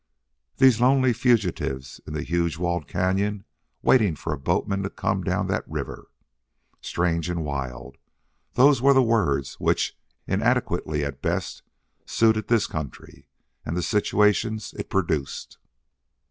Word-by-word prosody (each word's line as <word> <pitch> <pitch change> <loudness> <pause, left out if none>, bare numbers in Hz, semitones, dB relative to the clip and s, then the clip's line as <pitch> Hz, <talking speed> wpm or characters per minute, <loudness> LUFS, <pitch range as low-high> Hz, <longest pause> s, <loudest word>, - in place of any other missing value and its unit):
These 130 -4 +5
lonely 130 0 +4
fugitives 105 - 0
in 75 - -6
the 75 0 -3
huge 85 -1 -1
walled 85 -3 -2
cañon 95 +3 0 0.4
waiting 105 -10 +4
for 80 - -4
a - - -4
boatman 100 +8 0
to 100 - -3
come - - -2
down - - 0
that - - 0
river! - - -6 0.7
Strange 85 -1 -1
and 85 -3 -2
wild 70 -1 -5 0.5
those 135 0 +5
were 140 +1 +5
the 130 - +6
words 95 - 0
which, - - 0 0.3
inadequately 75 -1 0
at 70 -1 -6
best, 85 +2 -2 0.5
suited 110 -1 +2
this 115 -3 +3
country 75 -4 -8 0.4
and 85 - -3
the 90 - -1
situations 105 +1 +1
it - - -6
produced. 80 -7 -2
90 Hz, 130 wpm, -24 LUFS, 75-110 Hz, 0.7 s, the